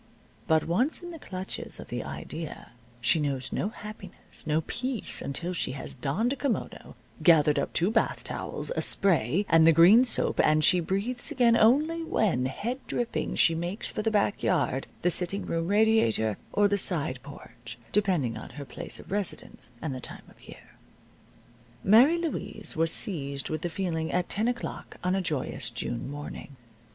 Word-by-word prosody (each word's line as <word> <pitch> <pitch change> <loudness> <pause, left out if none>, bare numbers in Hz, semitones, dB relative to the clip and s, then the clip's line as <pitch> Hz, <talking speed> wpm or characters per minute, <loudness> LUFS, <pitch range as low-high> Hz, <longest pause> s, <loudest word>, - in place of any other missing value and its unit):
But 160 -1 +3
once 250 - +1
in 350 - -7
the 330 - -9
clutches 185 -7 -6
of - - -10
the - - -3
idea 75 - -7 0.3
she 125 +7 +3
knows 135 -3 -2
no 200 - -1
happiness, 215 -6 -11
no 155 +1 +2
peace, 250 - -3
until 170 +6 0
she 170 - -2
has 135 - -6
donned 180 - -1
a - - -4
kimono, 275 -4 -3 0.3
gathered 150 -3 +5
up 140 - -2
two 175 +5 +1
bath 225 - 0
towels, - - -3
a - - 0
spray, 185 - +2
and 165 0 +5
the - - +8
green 180 +9 +7
soap, 250 - +1
and 155 0 +3
she 180 +4 +5
breathes 200 +8 -2
again 240 -2 +4
only 295 +9 +3
when, 180 - +1
head 235 - -4
dripping, 240 -1 -2
she 165 - +5
makes 175 +5 -3
for - - -3
the 225 - +1
back 205 -1 +1
yard, 130 +1 0 0.2
the 180 - +3
sitting 185 +3 -1
room 165 0 -2
radiator, 200 - +3 0.2
or 205 0 +4
the 200 0 0
side 145 -9 0
porch 120 -5 -11
(depending 180 - +1
on - - -8
her 145 -1 -8
place - - -7
of - - -13
residence, 200 -10 -3
and 155 -4 -2
the 130 - -6
time - - -7
of - - -22
year). - - -14 1.1
Mary 245 - +6
Louise 310 -10 -2
was 165 0 +2
seized 140 -8 -1
with 155 -1 -2
the 175 - -2
feeling 165 -3 -2
at 180 0 0
ten 215 +3 +1
o'clock 240 -1 -4
on 180 +1 +1
a 195 - +1
joyous 135 -7 -3
June 120 +1 -4
morning. 145 -1 -8
175 Hz, 175 wpm, -28 LUFS, 145-215 Hz, 1.1 s, the